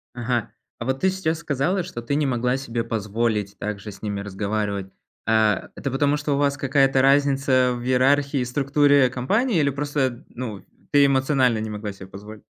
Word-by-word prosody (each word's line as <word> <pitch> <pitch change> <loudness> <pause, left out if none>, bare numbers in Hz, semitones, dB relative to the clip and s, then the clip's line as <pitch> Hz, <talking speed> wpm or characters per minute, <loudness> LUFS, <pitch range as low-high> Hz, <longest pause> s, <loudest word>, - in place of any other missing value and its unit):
Ага, 120 -1 -2 0.3
а 115 - -5
вот 130 +1 -1
ты 190 - +3
сейчас 165 -4 -2
сказала, 170 +7 -1
что 120 -9 -7
ты 130 +5 -2
не 150 - +1
могла 125 0 0
себе 120 -3 -3
позволить 105 -2 -2
также 105 0 -5
с 100 - -14
ними 100 -2 -3
разговаривать, 100 -1 -3 0.3
а. 110 -3 +2
Это 135 - -4
потому, 145 +2 +1
что 145 -1 -1
у - - -1
вас 145 0 +1
какая-то 135 -1 +2
разница 135 -2 +3
в 120 - -7
иерархии 135 +2 +2
и 125 - -1
структуре 140 +1 +3
компании? 190 - 0
Или 140 - +2
просто, 140 -3 -2
ну, 110 -6 -7 0.3
ты 145 -1 +6
эмоционально 130 -4 +2
не 110 - -4
могла 105 0 -5
себе 95 -1 -11
позволить? 105 +2 -11
130 Hz, 180 wpm, -23 LUFS, 110-140 Hz, 0.3 s, ты